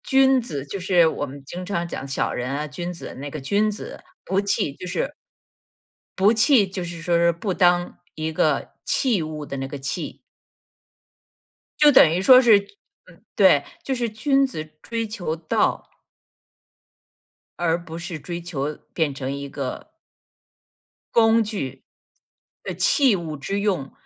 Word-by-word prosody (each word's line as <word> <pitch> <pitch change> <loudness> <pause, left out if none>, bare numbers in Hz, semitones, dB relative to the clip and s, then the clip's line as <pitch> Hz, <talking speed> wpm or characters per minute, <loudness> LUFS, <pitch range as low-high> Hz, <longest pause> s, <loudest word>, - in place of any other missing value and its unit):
君 265 -1 +4
子 145 - -5
就 195 +7 -5
是 180 -2 +4
我 155 - -2
们 140 0 -10
经 180 +5 -7
常 175 -3 -2
讲 140 - -6
小 135 - -1
人 125 0 -3
啊 150 +2 -3
君 175 +4 -5
子， 175 - -8
那 145 +1 -5
个 155 - -6
君 200 +10 +1
子， 210 - -7 0.2
不 195 +1 +1
器 200 -8 0
就 180 - -9
是 175 - -2 1.1
不 200 +4 +5
器 225 -1 +4
就 185 -1 -5
是 170 -1 -7
说 170 0 +1
说 170 0 +4
不 185 +4 -3
当 175 -1 +2 0.2
一 155 0 -3
个 155 -2 +1
器 235 -9 +1
物 155 -1 -6
的 140 - -6
那 135 0 -3
个 140 - -6
器。 135 - -4 1.6
就 295 -1 +7
等 255 - +7
于 175 +3 0
说 255 +5 +8
是 205 -4 +3 0.6
对， - - +5 0.2
就 270 - -2
是 240 -2 -1
君 275 +6 +2
子 205 -13 -5 0.2
追 230 -1 -3
求 190 -7 -3
道 165 -1 -1 1.7
而 170 0 +1
不 165 -2 -8
是 175 -1 -5
追 175 +2 -6
求 150 -4 -4 0.2
变 155 -4 0
成 135 -1 -5
一 140 0 -5
个 135 -2 -5 1.3
工 225 0 +5
具。 195 - -5 0.8
呃 - - -4
器 285 - +3
物 165 -4 -5
之 195 +9 -3
用。 190 -10 -1
175 Hz, 165 characters per minute, -23 LUFS, 150-210 Hz, 1.7 s, 说